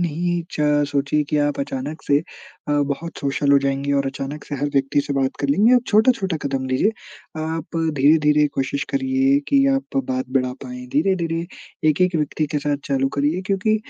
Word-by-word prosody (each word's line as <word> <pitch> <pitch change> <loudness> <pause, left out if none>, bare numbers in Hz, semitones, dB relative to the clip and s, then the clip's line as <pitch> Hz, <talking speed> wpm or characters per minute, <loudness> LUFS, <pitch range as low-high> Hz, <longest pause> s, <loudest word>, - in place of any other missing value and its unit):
नहीं 175 +1 -1
च 150 -1 +2
सोचिए 145 +1 0
कि 150 - +1
आप 145 - -2
अचानक 140 +3 -5
से 140 0 +3 0.5
अ, - - +1 0.2
बहुत 165 +4 -7
सोशल 140 0 0
हो 140 - +7
जाएँगी 140 +1 -1
और 140 -1 +1
अचानक 135 +2 -5
से 145 - -5
हर 145 +2 -1
व्यक्ति 135 +1 +2
से 140 - -2
बात 135 -1 +1
कर 140 - -1
लेंगे। 210 - +4
आप 250 - +4
छोटा-छोटा 210 -5 +2
कदम 135 -1 -2
लीजिए। 130 +11 +2 0.5
आप 160 +1 -4 0.2
धीरे-धीरे 150 +1 +4
कोशिश 135 +1 -1
करिए 270 0 +2
कि 275 -1 +4
आप 270 - -4
बात 130 0 -2
बढ़ा 130 -1 0
पाएँ। 125 -1 -8
धीरे-धीरे 165 +1 0 0.4
1-1 180 +4 +2
व्यक्ति 155 0 -1
के - - +3
साथ 145 0 -1
चालू 135 -1 0
करिए 155 +6 +1
क्योंकि 205 +2 +1
150 Hz, 180 wpm, -21 LUFS, 140-175 Hz, 0.5 s, हो